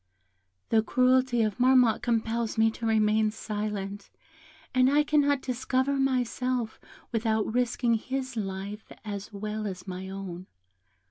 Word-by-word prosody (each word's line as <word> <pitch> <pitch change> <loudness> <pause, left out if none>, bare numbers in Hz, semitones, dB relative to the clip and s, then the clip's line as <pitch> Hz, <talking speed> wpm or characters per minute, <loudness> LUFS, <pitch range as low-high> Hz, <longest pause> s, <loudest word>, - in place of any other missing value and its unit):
"The 225 - +4
cruelty 255 0 +3
of 215 +1 -2
Marmotte 250 -3 +5
compels 230 -1 -1
me 225 0 +4
to 230 +1 -4
remain 215 0 +3
silent, 205 -2 -4 0.6
and 255 0 +5
I 295 +2 +4
cannot 285 -2 +2
discover 260 +2 0
myself 255 -3 0 0.3
without 220 -2 0
risking 245 -1 +1
his 260 +3 -3
life 200 0 -5
as 205 0 -5
well 215 +1 -4
as 185 -2 -6
my 185 +1 -5
own. 190 -2 -7
225 Hz, 125 wpm, -28 LUFS, 210-255 Hz, 0.6 s, Marmotte